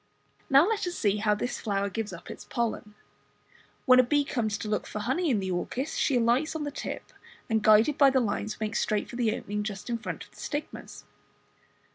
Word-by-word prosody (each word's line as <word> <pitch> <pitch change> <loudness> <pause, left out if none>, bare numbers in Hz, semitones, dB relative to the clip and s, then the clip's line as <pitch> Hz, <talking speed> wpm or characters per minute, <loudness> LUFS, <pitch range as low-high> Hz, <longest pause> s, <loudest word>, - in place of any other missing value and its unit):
Now 275 +5 +6
let 425 -4 0
us 350 - -3
see 205 -2 +1
how 210 0 +2
this 245 +4 -3
flower 200 -2 -1
gives 210 +1 -4
up 170 - -9
its - - -9
pollen. 220 -3 -3 0.9
When 255 -1 +7
a - - +7
bee 290 +4 +2
comes 220 -6 -1
to 215 - -6
look 210 0 -1
for - - -6
honey 260 +11 0
in 235 -6 +2
the 190 -1 -3
orchis, 255 - -3
she 270 - +2
alights 245 +7 +2
on 315 - -2
the 290 -1 -4
lip, - - -6 0.3
and 220 -2 +1
guided 215 +7 +5
by 280 -2 +8
the 265 0 +3
lines 215 -2 -2
makes 215 -1 -1
straight 210 -1 0
for - - -8
the 235 -3 +1
opening 210 +1 -4
just 210 +2 -5
in 235 - -1
front 225 - -5
of - - -18
the - - -20
stigmas. 295 0 -6
230 Hz, 215 wpm, -28 LUFS, 210-270 Hz, 0.9 s, by